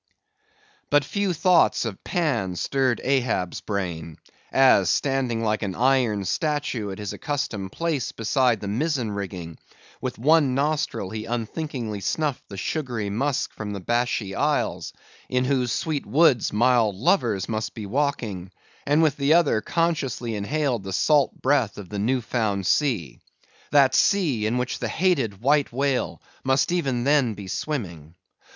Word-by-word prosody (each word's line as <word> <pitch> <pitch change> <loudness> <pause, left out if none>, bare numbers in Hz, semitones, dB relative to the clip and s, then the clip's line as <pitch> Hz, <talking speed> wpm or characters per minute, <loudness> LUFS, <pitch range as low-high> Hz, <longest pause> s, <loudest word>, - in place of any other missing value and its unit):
But 145 -1 +3
few 200 +3 -1
thoughts 180 -5 +3
of 110 -4 -6
Pan 150 - -1
stirred 130 +7 0
Ahab's 125 -9 0
brain, 85 -6 -4 0.3
as 130 -9 +5
standing 130 -3 0
like 110 -1 0
an 95 -4 -3
iron 120 -5 +2
statue 145 - -1
at 95 - -6
his 105 -2 -5
accustomed 110 -10 -3
place 165 -3 -2
beside 115 0 +1
the 100 - -5
mizen 125 +1 -1
rigging, 90 -5 -6 0.4
with - - -4
one 145 +1 +3
nostril 140 -9 -1
he 110 0 -5
unthinkingly 120 -1 -4
snuffed 150 +4 -2
the 100 - -8
sugary 120 - -3
musk 135 +6 -1
from 105 -1 -5
the 100 - -5
Bashee 120 -1 -1
isles 145 +7 -1 0.4
(in 125 0 +1
whose 125 -3 +1
sweet 155 +1 -2
woods 140 -5 +3
mild 115 -2 +3
lovers 115 - +1
must 110 -1 -3
be 110 - -6
walking), 110 -6 -2 0.4
and 150 +3 +4
with 150 -3 +2
the 145 +3 +3
other 150 -10 +3
consciously 140 -6 -1
inhaled 125 +3 -1
the 95 0 -6
salt 145 +6 +2
breath 130 -6 +2
of 100 -4 -9
the 105 - -4
new 125 +5 +1
found 110 -4 -1
sea; 105 - 0 0.5
that 135 -2 +5
sea 150 - +2
in 120 +3 0
which 125 0 -2
the 120 - -2
hated 130 - 0
White 145 +3 +2
Whale 135 +1 -1 0.2
must 135 +4 +2
even 135 -9 0
then 135 -5 +2
be 100 -1 -9
swimming. 85 - -4
125 Hz, 150 wpm, -24 LUFS, 105-145 Hz, 0.5 s, as